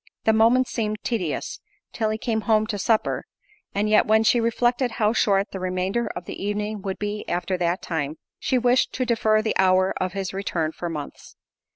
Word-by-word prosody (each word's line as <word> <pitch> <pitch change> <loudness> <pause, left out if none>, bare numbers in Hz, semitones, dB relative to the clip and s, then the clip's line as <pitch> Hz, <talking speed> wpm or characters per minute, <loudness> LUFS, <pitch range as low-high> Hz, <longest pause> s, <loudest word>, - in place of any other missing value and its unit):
The 220 - +4
moments 235 +3 +4
seemed 215 -2 -2
tedious 185 -11 -2 0.3
till 220 -2 0
he 215 - -1
came 220 -1 -1
home 215 0 +2
to 210 -2 -4
supper, 220 +3 +1 0.5
and 205 +1 +1
yet, 215 0 +4
when 220 +1 +4
she 240 +2 +4
reflected 240 +1 +1
how 215 0 +1
short 200 -3 +2
the 190 - -5
remainder 185 +5 -1
of 180 - -6
the - - -7
evening 210 0 -2
would 190 -1 -4
be 210 0 -3
after 175 +2 -1
that 175 +1 0
time, 155 -2 -3 0.2
she 260 - +1
wished 245 +1 +2
to 255 - -1
defer 220 -2 +2
the 220 - -1
hour 185 0 +4
of 185 0 -1
his 195 -2 -3
return 170 -5 -2
for 175 +1 -5
months. 150 -3 -8
210 Hz, 195 wpm, -24 LUFS, 185-225 Hz, 0.5 s, The